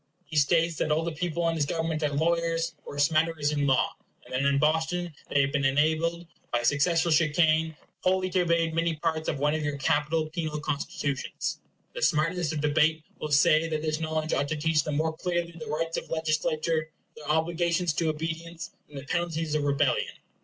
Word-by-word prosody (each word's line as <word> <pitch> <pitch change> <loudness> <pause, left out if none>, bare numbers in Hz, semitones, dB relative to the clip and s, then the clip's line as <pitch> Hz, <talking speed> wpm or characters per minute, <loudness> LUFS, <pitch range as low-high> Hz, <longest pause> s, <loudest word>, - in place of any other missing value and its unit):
He 155 - -9
states 165 +2 +3
that - - 0
all 155 +2 +2
the 170 - -2
people 170 +1 -1
in 165 - +1
his 150 -3 0
government 165 -1 -1
are 150 - +1
lawyers, 165 +2 0
or 145 - -8
smatterers 155 0 +2
in 145 -1 0
law; 135 -1 +3 0.3
and - - -12
that 130 - +1
in 140 0 +3
Boston 160 +3 +1 0.2
they 140 - +3
have 135 0 +1
been 140 -1 0
enabled, 160 +5 +1 0.3
by 120 0 0
successful 165 +6 +2
chicane, 160 0 +3 0.2
wholly 185 0 +1
to 185 - +2
evade 170 -1 +1
many 165 0 +1
parts 160 0 -1
of 150 - -1
one 145 +2 +1
of 155 -1 -1
your 145 -1 -2
capital 150 +2 +1
penal 155 -2 -3
constitutions. 145 -1 -3 0.3
The - - -6
smartness 165 - +1
of 155 -2 -3
debate 155 +1 +2 0.2
will 155 - -4
say 155 +2 +4
that 155 -1 -2
this 155 0 -1
knowledge 155 0 -2
ought 140 - +1
to 155 - -2
teach 155 0 +2
them 150 - -3
more 160 +1 0
clearly 175 0 -2
the 165 -2 -9
rights 165 +2 -2
of - - -5
legislature, 155 0 0 0.3
their 150 -1 -10
obligations 170 +2 +1
to 165 +1 0
obedience, 165 +2 -5 0.2
and 145 - -10
the 135 - -6
penalties 165 -1 -2
of 150 -1 0
rebellion. 140 -1 +1
160 Hz, 195 wpm, -27 LUFS, 150-165 Hz, 0.3 s, say